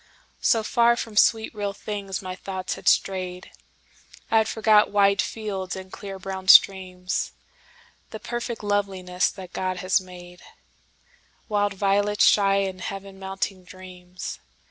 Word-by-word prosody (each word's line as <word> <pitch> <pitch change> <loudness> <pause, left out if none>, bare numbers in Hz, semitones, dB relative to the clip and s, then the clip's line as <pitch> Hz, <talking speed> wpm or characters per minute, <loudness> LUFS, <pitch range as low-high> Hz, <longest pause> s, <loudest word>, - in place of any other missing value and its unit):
So 225 -2 +3
far 235 +1 +3
from 225 -2 -6
sweet 220 +1 +3
real 205 -2 -3
things 200 -2 -5
my 185 0 -5
thoughts 190 -1 -5
had - - -9
strayed,I 185 +3 -2
had 220 - +1
forgot 215 -1 +4
wide 200 -1 +3
fields, 195 -4 -4
and 190 0 -10
clear 195 -2 -7
brown 190 0 -7
streams; 185 -2 +4 0.8
The 220 - -8
perfect 240 -1 -5
loveliness 195 -3 0
that 190 -2 -11
God 185 -1 -2
has 185 +2 +1
made,—Wild 185 +3 -8
violets 205 +1 +2
shy 195 -1 +4
and 190 -2 -1
Heaven 195 0 -7
mounting 190 0 -4
dreams. 180 0 -9
195 Hz, 125 wpm, -24 LUFS, 185-205 Hz, 0.8 s, forgot